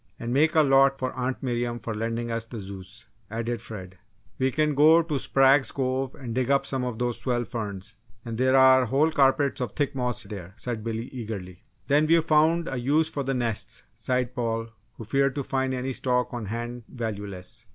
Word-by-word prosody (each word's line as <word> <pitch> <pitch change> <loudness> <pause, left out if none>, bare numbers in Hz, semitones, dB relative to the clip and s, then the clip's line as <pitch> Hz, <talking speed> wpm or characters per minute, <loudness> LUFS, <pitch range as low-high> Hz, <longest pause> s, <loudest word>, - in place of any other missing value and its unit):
"And 120 +1 -3
make 155 +5 +3
a 155 - +6
lot 135 -1 +5
for 130 -1 -3
Aunt 130 +1 -3
Miriam 120 -1 -1
for 115 -1 -5
lending 115 +2 -3
us 115 0 -3
the 115 -1 -7
Zeus," 100 +3 -9 0.2
added 115 +1 -3
Fred. 95 -5 -9 0.4
"We 130 0 +2
can 150 +2 +1
go 155 +4 +6
to 155 -4 -2
Sprague's 135 +1 +4
Cove 130 0 -2
and 120 -4 -6
dig 130 +1 0
up 140 0 +3
some 130 -2 -2
of 125 -3 -3
those 120 0 -1
swell 120 -2 0
ferns 110 -3 -6 0.3
and 115 -1 -4
there 130 +1 +3
are 130 -1 +7
whole 145 +7 +2
carpets 140 -1 +2
of 125 - -3
thick 145 -3 -1
moss 125 -2 -2
there," 95 -3 -9
said 115 -3 -4
Billy, 115 +1 -3
eagerly. 105 -7 -7 0.2
"Then 145 +2 +3
we've 165 0 +4
found 160 +2 +3
a 130 - -3
use 145 +6 +2
for 145 - -3
the 135 0 -1
nests!" 115 -3 -3
sighed 125 -1 -1
Paul, 115 -2 -2 0.2
who 115 - -9
feared 135 +3 +1
to 140 - -2
find 130 0 -1
any 130 +1 -2
stock 125 -1 0
on 120 -3 -4
hand 120 +3 -4
valueless. 105 -2 -6
125 Hz, 200 wpm, -26 LUFS, 115-135 Hz, 0.4 s, are